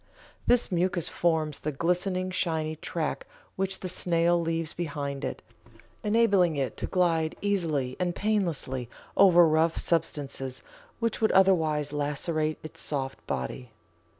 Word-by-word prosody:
This 245 -3 +4
mucus 175 -1 +1
forms 160 -3 0
the 155 - -2
glistening, 180 +4 0
shiny 160 -4 -1
track - - -3 0.3
which 195 0 -2
the 185 - -3
snail 175 -1 +2
leaves 165 -1 -2
behind 145 -4 -4
it, - - -4 0.6
enabling 205 -6 +3
it 135 -2 -2
to - - -3
glide 165 -4 +1
easily 160 -11 0
and 180 -1 -1
painlessly 170 - -1 0.3
over 175 -3 +7
rough 160 +1 +2
substances 140 -5 -2 0.4
which 230 -1 -1
would 220 - +3
otherwise 160 -6 +3
lacerate 155 +2 -1
its 155 - -8
soft 135 -2 -4
body. 70 - -4
165 Hz, 125 wpm, -28 LUFS, 150-185 Hz, 0.6 s, over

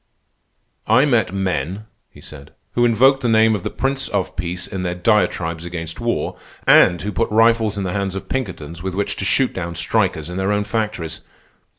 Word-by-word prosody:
"I 125 +6 +5
met 120 -9 +2
men," 95 0 -2 0.2
he - - -16
said, 70 -2 -13 0.2
"who 120 - +3
invoked 130 +4 +4
the 120 - 0
name 110 0 +4
of 105 - -2
the - - -3
Prince 135 0 -1
of 100 -3 -2
Peace 90 +1 -4
in 95 -3 -5
their 90 -1 -2
diatribes 90 -4 +1
against 85 0 -6
war, 120 0 -2 0.3
and 90 -1 +6
who 105 - -2
put 90 - -1
rifles 115 -1 +3
in 100 - -2
the 90 -1 -3
hands 100 -1 -2
of 95 - -6
Pinkertons 85 - -4
with 95 0 -4
which 100 +1 -1
to 100 - -3
shoot 130 +6 +2
down 85 -2 -5
strikers 80 -1 0
in 90 +1 -6
their 95 +1 0
own 105 0 +1
factories. 105 -6 -3
95 Hz, 195 wpm, -20 LUFS, 90-110 Hz, 0.3 s, and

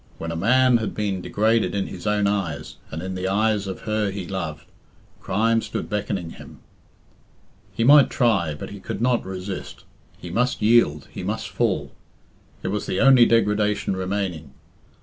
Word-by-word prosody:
When 85 0 -5
a - - -4
man 125 +7 +4
had 110 -2 -4
been 100 -3 -2
degraded 110 +3 +1
in 100 - 0
his 90 +3 -7
own 105 -1 +2
eyes, 90 -8 -2
and 80 +2 -6
in 95 0 -4
the 95 0 -3
eyes 105 0 +1
of 95 - -6
her 110 -1 -1
he 95 -1 -5
loved, 85 -5 -5 0.5
crime 115 +4 +1
stood - - -5
beckoning 100 -5 -2
him. - - -12 1.2
He 115 - 0
might 140 +3 +7
try, 100 - +1
but 75 - -8
he 100 - -8
could 95 - -5
not 120 0 +1
resist; 95 0 -7 0.3
he 90 - -9
must 125 +6 0
yield, 105 -10 +3
he - - -7
must - - -3
fall. - - -1 0.7
It - - -2
was - - -3
the - - -1
only 130 -3 +7
degradation 105 -3 +1
remaining. 90 -7 -3
100 Hz, 170 wpm, -23 LUFS, 90-110 Hz, 1.2 s, might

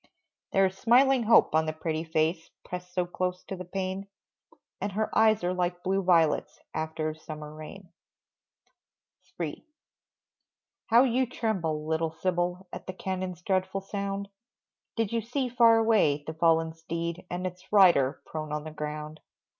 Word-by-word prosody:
There 195 0 +4
is 190 0 -1
smiling 255 +2 +5
hope 225 -7 +5
on 160 0 +3
the 155 - -1
pretty 160 0 -3
face 160 +1 0 0.2
Pressed 180 0 -7
so 180 0 0
close 180 +1 -3
to 195 - -6
the 185 - -7
pane, 190 +2 -4 0.7
And 200 -1 -2
her 215 +2 -2
eyes 220 -3 +4
are 180 +1 +1
like 180 -1 -2
blue 195 +1 +1
violets 170 -4 +2
After 155 0 -2
a - - -10
summer 155 -1 -8
rain. 165 +4 -10 1.5
III. - - -4 1.2
How 235 +3 +6
you 255 0 +2
tremble, 170 -11 -2
little 160 +1 0
Sybil, 180 +1 -1
At - - -8
the 185 - -4
cannons' 185 -2 -4
dreadful 190 +1 0
sound, 200 0 -4 0.7
Did 225 -3 0
you 230 - +1
see 250 +3 -2
far 230 -1 +6
away, 210 -11 +3
the 160 - -5
fallen 165 0 +2
steed, 170 +2 -5
And 180 +1 -3
its 180 0 -7
rider 145 -9 +5
prone 155 -1 -5
on 150 0 -2
the 155 - -7
ground? 150 0 -6
180 Hz, 155 wpm, -28 LUFS, 160-195 Hz, 1.5 s, How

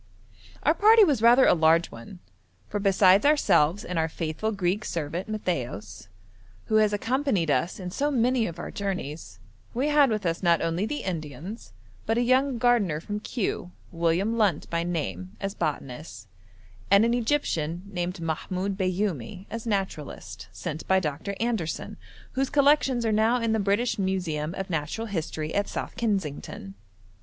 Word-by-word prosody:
Our - - +4
party 440 +2 +6
was 290 - +2
rather 240 +3 +7
a - - +6
large 165 +1 +3
one, 115 +11 -11 0.5
for 205 - -3
besides 195 -1 +5
ourselves 205 - +3
and 180 -2 -2
our 160 0 +1
faithful 160 +7 -3
Greek 195 0 -1
servant 170 +3 -4
Matthaios, 125 - -4 0.6
who 215 - +2
has 215 -1 +4
accompanied 225 - 0
us 170 +7 0
in 180 -1 -5
so 285 +9 0
many 250 -3 +2
of 170 - -7
our - - -6
journeys, 165 - -5 0.4
we 270 +5 +1
had 295 -2 +5
with 215 -3 -2
us 165 -1 -1
not 170 -3 +4
only 165 +5 -1
the 295 +3 -4
Indians, 165 - -6 0.4
but 225 - +1
a 240 - +3
young 260 +1 +2
gardener 220 -10 +2
from 205 +5 -5
Kew, 210 -5 -3 0.2
William 175 +7 0
Lunt 195 -8 +2
by 170 0 0
name, 95 - -4
as 195 0 -3
botanist, 135 - -5 0.6
and 200 +3 +6
an 235 - +2
Egyptian 185 - -1
named 180 -2 -4
Mahmoud 185 +4 -2
Bayoumi, 185 - -2
as 230 +1 -5
naturalist, 195 -8 -4
sent 155 - -6
by 190 0 +4
Dr. 165 +4 -3
Anderson, 225 -9 -2 0.4
whose 270 0 -1
collections 280 -4 +3
are 220 - +2
now 220 +3 +3
in 230 -1 0
the 220 - +1
British 205 +4 +1
Museum 175 -4 -1
of 195 - -4
Natural 165 +8 -2
History 160 -6 -4
at 205 0 0
South - - -5
Kensington. 165 - -3
195 Hz, 160 wpm, -26 LUFS, 165-225 Hz, 0.6 s, rather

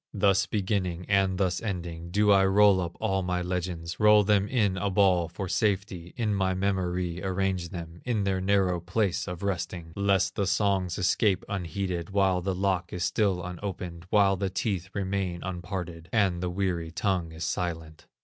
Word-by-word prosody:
Thus 100 -1 +3
beginning, 95 -4 -1
and 95 -2 +2
thus 90 -2 0
ending, 85 -5 -5
Do 105 +3 +3
I 95 -1 +6
roll 100 -1 +5
up 85 -1 -5
all 95 -3 0
my 90 -1 -1
legends, 90 -2 -4
Roll 105 0 +6
them 100 -1 +2
in 105 -6 +1
a 100 +2 -1
ball 95 -3 +3
for 95 +3 -5
safety, 95 -3 -1
In 110 -3 0
my 95 -1 +1
memory 90 -2 -1
arrange 95 -2 -1
them, 85 -1 -8
In 115 -5 0
their 95 -1 0
narrow 95 -2 +2
place 95 +2 -1
of 90 +1 -6
resting, 85 -3 -3
Lest 100 -1 +2
the 100 - -1
songs 95 -3 +1
escape 95 +1 +2
unheeded, 90 -2 -3
While 95 -2 +2
the 95 +1 -2
lock 95 -2 0
is 90 - -3
still 90 0 +1
unopened, 90 -1 -6
While 100 -2 +4
the 95 +1 -1
teeth 95 -2 -2
remain 95 -3 -2
unparted, 90 -2 -5
And 95 -6 +2
the 90 - -1
weary 90 -3 -2
tongue 90 -1 -1
is 80 -1 -5
silent. 80 -3 -4
95 Hz, 170 wpm, -27 LUFS, 90-100 Hz, -, I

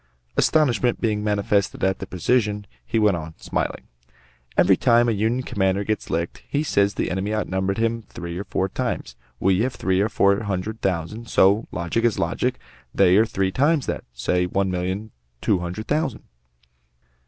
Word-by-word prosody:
Astonishment 130 -5 +2
being 105 -2 0
manifested 100 -2 0
at 95 0 +1
the - - -6
precision, 105 +2 0 0.2
he - - -2
went 105 -4 +4
on, 80 -1 -6
smiling: - - -3 0.7
"Every - - +6
time 120 +1 +4
a - - +3
Union 110 +4 0
commander 95 -3 0
gets 110 +1 -2
licked, 85 +1 -2
he 145 +1 0
says 100 -8 +2
the - - -1
enemy 95 +4 -1
outnumbered 95 -2 -1
him 115 0 0
three 85 0 -6
or - - -3
four 95 - -1
times. 65 -8 -3 0.2
We 95 0 +3
have 125 +3 0
three 95 0 +1
or 105 - +1
four 100 0 +3
hundred 100 +2 -3
thousand, 95 +6 -2
so 100 +4 +4
logic 85 +6 -1
is 120 -3 +2
logic! - - 0 0.4
they 95 -2 +5
are 110 +1 +4
three 95 -3 0
times 145 - +2
that; - - -3
say, 90 +9 0
one 95 +1 0
million 95 +4 -3 0.3
two 90 - +1
hundred 90 +5 -5
thousand." 150 -5 -1
100 Hz, 170 wpm, -23 LUFS, 95-115 Hz, 0.7 s, Every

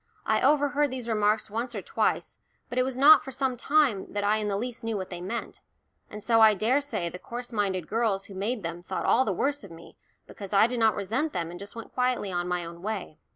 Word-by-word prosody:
I - - +2
overheard 290 0 +3
these 255 -2 -6
remarks 215 -1 +1
once 235 +2 -3
or 200 - -4
twice, - - -1 0.3
but 245 +1 -1
it - - +4
was 260 -1 -3
not 290 +4 +8
for - - -9
some 265 -1 -1
time 260 -5 +1
that 205 0 -1
I 210 +1 +3
in 215 -1 -2
the 200 -1 -1
least 245 +2 -5
knew 225 -2 -2
what 190 -1 -6
they 175 -1 -6
meant, 225 +6 -5 0.5
and 210 0 -9
so 230 -1 +3
I 215 -1 +7
daresay 245 -2 0
the 180 - -9
coarse 245 +4 -7
minded 190 -6 -1
girls 215 -4 0
who 200 - -11
made 205 +3 -3
them 170 +1 -5
thought 175 - -4
all 260 - +4
the 210 - 0
worse 280 +8 -1
of 200 - -10
me 165 0 -13 0.3
because 200 -1 -9
I 200 +2 +6
did 240 +1 -2
not 220 -1 +4
resent 230 +11 -2
them 170 -1 -3
and 175 - -9
just 200 +3 -9
went 230 - -9
quietly 250 -5 0
on 175 0 -2
my 180 -1 -2
own 170 0 -10
way. 200 -6 -5
220 Hz, 245 wpm, -27 LUFS, 195-250 Hz, 0.5 s, not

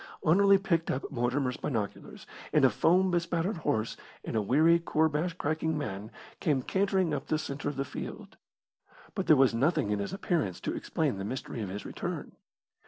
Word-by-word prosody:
Anerley 195 +5 +6
picked 170 -4 0
up 135 - -2
Mortimer's 125 0 0
binoculars, 110 -7 -4 0.3
and - - +5
a - - +5
foam 185 +3 +3
bespattered 170 +3 0
horse 110 -8 -1 0.3
and - - -4
a 110 - +2
weary 155 +10 +4
koorbash 160 +1 0
cracking 160 0 -1
man 105 -6 -4 0.3
came 140 -5 +1
cantering 190 -2 +1
up 140 -2 -3
the 155 - +1
centre 145 -1 -4
of 145 - -5
the 135 +1 -2
field. - - -7 0.8
But - - -3
there 155 - +8
was 135 -3 +4
nothing 120 -3 +1
in 105 - 0
his 100 - -3
appearance 170 - -1
to - - -2
explain 95 - -1
the - - -3
mystery 120 +1 -5
of 100 - -4
his 100 +2 -6
return. - - -5
150 Hz, 175 wpm, -30 LUFS, 120-170 Hz, 0.8 s, there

